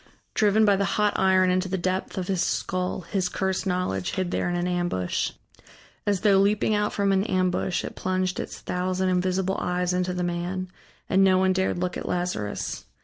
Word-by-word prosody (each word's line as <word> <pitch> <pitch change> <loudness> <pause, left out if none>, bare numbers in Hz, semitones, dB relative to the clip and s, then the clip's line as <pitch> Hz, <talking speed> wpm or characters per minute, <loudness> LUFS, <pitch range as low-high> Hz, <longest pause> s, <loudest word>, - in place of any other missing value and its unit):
Driven 215 +1 +4
by 200 -2 +4
the 200 - +1
hot 210 -1 +3
iron 185 -1 +4
into 185 +1 0
the 190 - -1
depth 185 +2 -2
of 185 -1 -2
his 190 -3 0
skull, 185 0 -1
his 180 +1 -1
cursed 190 +1 -1
knowledge 180 - -1
hid 185 -1 -1
there - - 0
in 175 - -1
an 175 0 -1
ambush. 175 - -1 0.7
As 200 -3 +1
though 200 -2 +5
leaping 205 +2 +2
out 210 0 +1
from 200 -1 +1
an 195 0 +3
ambush 185 -2 0
it - - -6
plunged 185 0 -1
its - - -6
thousand 185 +1 -1
invisible 185 +1 0
eyes 180 0 0
into 180 0 -1
the 180 - -1
man, 175 +2 -3 0.4
and 195 0 +4
no 190 -1 +5
one 190 0 +3
dared 190 -1 0
look 180 0 -2
at - - -5
Lazarus. 175 -13 -3
185 Hz, 195 wpm, -25 LUFS, 180-190 Hz, 0.7 s, though